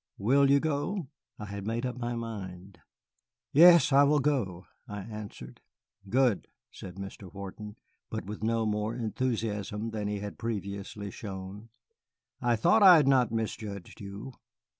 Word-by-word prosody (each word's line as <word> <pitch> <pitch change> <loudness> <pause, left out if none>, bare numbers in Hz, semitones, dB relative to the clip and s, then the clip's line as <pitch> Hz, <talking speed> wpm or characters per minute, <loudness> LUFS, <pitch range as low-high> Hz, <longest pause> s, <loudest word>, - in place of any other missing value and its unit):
Will 135 +7 +4
you 140 0 +6
go?" 155 +2 -2 0.3
I 105 - -7
had 100 0 -6
made 115 +3 -1
up 125 - -3
my 120 -1 -3
mind. 100 -5 -7 0.7
"Yes, 170 -1 +8
I 140 - +7
will 145 +1 +4
go," 120 -12 0 0.2
I 105 -1 -6
answered. 105 0 -9 0.5
"Good," 120 - +2 0.2
said 90 -2 -10
Mr. 95 -1 -8
Wharton, 100 +2 -8 0.3
but 110 - -4
with 105 +1 -7
no 115 0 +1
more 105 +1 -1
enthusiasm 110 -2 -2
than 105 -2 -3
he 105 0 -2
had 100 0 -7
previously 100 -2 -5
shown; 100 +2 -8 0.7
"I 120 -1 +2
thought 175 - +4
I 190 -3 +10
had 150 -4 +4
not 130 -4 +4
misjudged 110 -4 -5
you. 100 +6 -8
110 Hz, 145 wpm, -29 LUFS, 100-130 Hz, 0.7 s, I